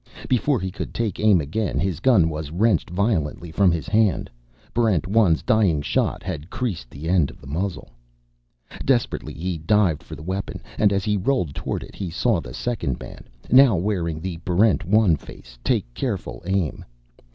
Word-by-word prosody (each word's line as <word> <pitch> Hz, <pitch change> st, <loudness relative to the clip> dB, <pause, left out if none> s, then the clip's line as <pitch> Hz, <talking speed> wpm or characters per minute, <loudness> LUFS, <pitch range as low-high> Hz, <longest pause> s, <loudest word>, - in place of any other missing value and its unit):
Before 130 Hz, +2 st, +2 dB
he 95 Hz, 0 st, -3 dB
could 100 Hz, -, -6 dB
take 110 Hz, -6 st, -2 dB
aim 105 Hz, -4 st, +5 dB
again, 85 Hz, +4 st, -2 dB
his 85 Hz, -1 st, -1 dB
gun 105 Hz, -7 st, +4 dB
was 75 Hz, -2 st, -4 dB
wrenched 95 Hz, +3 st, +1 dB
violently 90 Hz, -4 st, -1 dB
from 95 Hz, +2 st, +4 dB
his 85 Hz, -2 st, -3 dB
hand. 105 Hz, -4 st, +2 dB, 0.4 s
Barrent 110 Hz, -9 st, +2 dB
1's 95 Hz, -5 st, +3 dB
dying 95 Hz, -10 st, +2 dB
shot -, -, 0 dB
had 75 Hz, +5 st, -5 dB
creased 95 Hz, -, -3 dB
the 75 Hz, +5 st, -8 dB
end 85 Hz, -5 st, +3 dB
of -, -, -13 dB
the -, -, -15 dB
muzzle. 85 Hz, 0 st, -4 dB, 0.9 s
Desperately 125 Hz, -3 st, 0 dB
he 85 Hz, +1 st, -3 dB
dived 90 Hz, -1 st, +2 dB
for -, -, -9 dB
the -, -, -10 dB
weapon, 95 Hz, +4 st, -4 dB, 0.2 s
and 105 Hz, -2 st, +4 dB
as 100 Hz, -1 st, 0 dB
he 105 Hz, -1 st, +1 dB
rolled 95 Hz, -, 0 dB
toward -, -, -3 dB
it -, -, -12 dB
he 95 Hz, -3 st, -4 dB
saw 100 Hz, +4 st, +1 dB
the -, -, -9 dB
second 105 Hz, -, -2 dB
man, -, -, -10 dB, 0.3 s
now 130 Hz, -3 st, +7 dB
wearing 85 Hz, -4 st, -1 dB
the 85 Hz, 0 st, -4 dB
Barrent 90 Hz, +1 st, +2 dB
1 100 Hz, -3 st, +4 dB
face, -, -, -14 dB
take -, -, +1 dB
careful 85 Hz, -, -4 dB
aim. 95 Hz, -5 st, -1 dB
95 Hz, 175 wpm, -23 LUFS, 80-105 Hz, 0.9 s, now